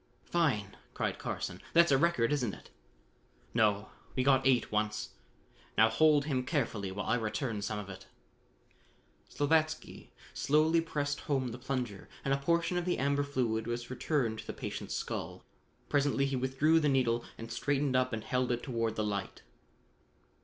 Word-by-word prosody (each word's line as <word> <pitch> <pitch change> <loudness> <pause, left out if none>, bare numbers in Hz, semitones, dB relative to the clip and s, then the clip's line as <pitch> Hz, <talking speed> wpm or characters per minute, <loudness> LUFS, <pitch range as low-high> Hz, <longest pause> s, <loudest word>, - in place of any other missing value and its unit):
"Fine!" 125 - 0 0.2
cried - - -2
Carson. - - -4
"That's 170 -2 +6
a 135 - +6
record, 150 -7 +2
isn't 125 -8 -1
it?" - - -16 0.8
"No, 105 -2 +2 0.3
we 130 - +1
got 135 -1 +4
eight 125 -3 +3
once. 105 0 -1 0.7
Now 110 +1 +6
hold 150 +4 +4
him 130 -4 0
carefully 115 - -1
while 100 +2 -4
I - - +1
return 110 0 -2
some 110 +1 -2
of 105 -2 -6
it." 100 -1 -10 1.2
Slavatsky 155 +2 0 0.2
slowly 155 +3 +3
pressed 145 -3 -2
home 135 -4 -1
the 120 +2 -7
plunger 125 -7 -4 0.2
and 135 - +2
a - - +2
portion 170 +4 +1
of 175 - -1
the 180 - 0
amber 140 +1 +1
fluid 125 -6 -1
was 120 +1 -4
returned 125 -4 0
to - - -9
the - - -4
patient's - - -5
skull. - - -4 0.4
Presently 140 -1 +2
he 135 -1 -1
withdrew 135 +5 +3
the 150 -2 +2
needle 120 -3 +2
and 115 0 -8
straightened 140 +2 0
up 130 0 +2
and 110 -2 -3
held 125 -1 0
it 120 0 -1
toward 115 -4 -1
the 110 - -1
light. 100 -2 -3
130 Hz, 165 wpm, -32 LUFS, 115-145 Hz, 1.2 s, That's